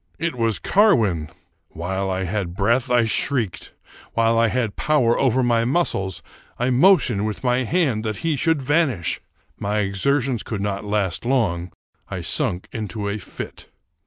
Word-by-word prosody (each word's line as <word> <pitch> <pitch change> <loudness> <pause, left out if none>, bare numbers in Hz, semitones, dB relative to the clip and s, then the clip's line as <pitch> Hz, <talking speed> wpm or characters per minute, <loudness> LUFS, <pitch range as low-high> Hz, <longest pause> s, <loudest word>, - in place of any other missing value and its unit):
It 165 -1 -2
was 115 -2 +2
Carwin! 110 - +3 0.4
While 95 +3 -3
I 95 0 -1
had 90 -2 -3
breath, 115 +6 +1
I 120 -2 +4
shrieked. 110 -5 -1 0.4
While 115 0 +2
I 115 - +4
had 115 -3 -1
power 130 -7 +2
over 130 -1 +2
my 120 -1 +2
muscles, 115 - -1 0.3
I 125 +2 0
motioned 130 - +4
with 110 +4 -5
my 125 0 +1
hand 135 -7 +1
that 110 -2 -2
he 160 -2 +2
should 160 0 +1
van 150 +4 +3
ish. 90 -10 -3 0.4
My 105 +1 -1
exertions 120 +5 0
could 110 - -4
not 100 0 -2
last 100 -4 -1
long: 100 -9 0 0.4
I 95 - -4
sunk 90 - -1
into 105 -1 -4
a 105 +1 -3
fit. - - -9
115 Hz, 160 wpm, -22 LUFS, 100-130 Hz, 0.4 s, I